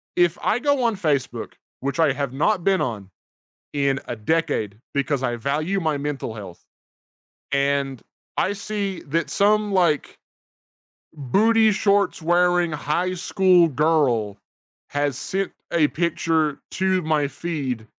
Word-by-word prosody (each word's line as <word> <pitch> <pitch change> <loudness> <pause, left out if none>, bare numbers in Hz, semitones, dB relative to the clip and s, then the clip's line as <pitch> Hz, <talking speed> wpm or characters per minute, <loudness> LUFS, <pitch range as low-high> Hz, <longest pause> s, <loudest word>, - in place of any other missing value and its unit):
if 175 -1 +3
I 220 - +2
go 285 0 +1
on 230 -3 +2
Facebook, 140 - -2 0.3
which 140 +4 -3
I 160 - +4
have 140 -1 -3
not 175 +6 +1
been 195 -1 +2
on 105 -6 -3 0.6
in 140 -1 +1
a 120 - -3
decade, 115 - -1 0.2
because 140 -1 0
I 120 -2 -1
value 155 - -1
my 155 -4 0
mental 140 -5 -4
health 100 -5 -10 0.9
and 140 -2 0 0.4
I 195 - +2
see 205 -2 -3
that 165 +4 -1
some, 210 +1 +2
like, 175 -6 +1 0.9
booty-shorts-wearing 180 - +2
high 155 +5 -1
school 180 -1 +3
girl 130 -9 +1 0.5
has 145 -2 -1
sent 195 +7 -2 0.2
a 160 -3 +3
picture 160 -3 0
to 190 -1 +1
my 155 -2 +1
feed. 135 -10 -4
155 Hz, 125 wpm, -23 LUFS, 140-185 Hz, 0.9 s, I